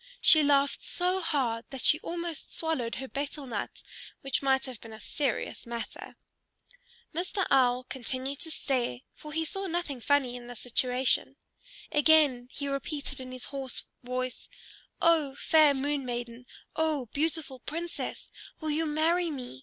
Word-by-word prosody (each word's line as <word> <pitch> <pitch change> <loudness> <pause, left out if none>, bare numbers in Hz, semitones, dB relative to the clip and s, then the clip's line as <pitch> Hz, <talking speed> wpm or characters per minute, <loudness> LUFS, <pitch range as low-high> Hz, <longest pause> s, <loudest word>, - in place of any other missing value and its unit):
She 310 - +8
laughed 280 -1 +3
so 365 +1 0
hard 250 -8 0
that 270 -2 -6
she 305 - +6
almost 340 -2 -4
swallowed 290 -8 -1
her 265 - -5
betel 285 +1 -4
nut, 225 -5 -4 0.4
which 270 -1 0
might 265 -1 +3
have 255 -4 -8
been 225 -1 -10
a 220 - -9
serious 265 0 -2
matter. 235 -1 -6 1.0
Mr. 365 +4 0
Owl 255 -2 +4
continued 260 +2 -4
to 320 - -1
stare, 250 - -1
for 300 - -10
he 320 +1 0
saw 390 +4 -3
nothing 330 -7 -2
funny 270 -2 +2
in 240 -1 -8
the 245 - -8
situation. 250 +2 +1 0.6
Again 295 -5 +5
he 280 - -4
repeated 280 +1 -3
in 255 0 -7
his 255 -1 -5
hoarse 270 -2 -2 0.2
voice, 255 0 -4 0.5
"O 310 -5 +4
fair 305 -2 +5
Moon 285 +1 -1
Maiden, 240 0 -5 0.3
O 310 -4 +1
beautiful 305 -3 0
Princess, 335 +6 -4 0.3
will 315 -1 -2
you 315 +2 +1
marry 330 +3 +2
me? 250 - -6
275 Hz, 150 wpm, -30 LUFS, 250-315 Hz, 1.0 s, She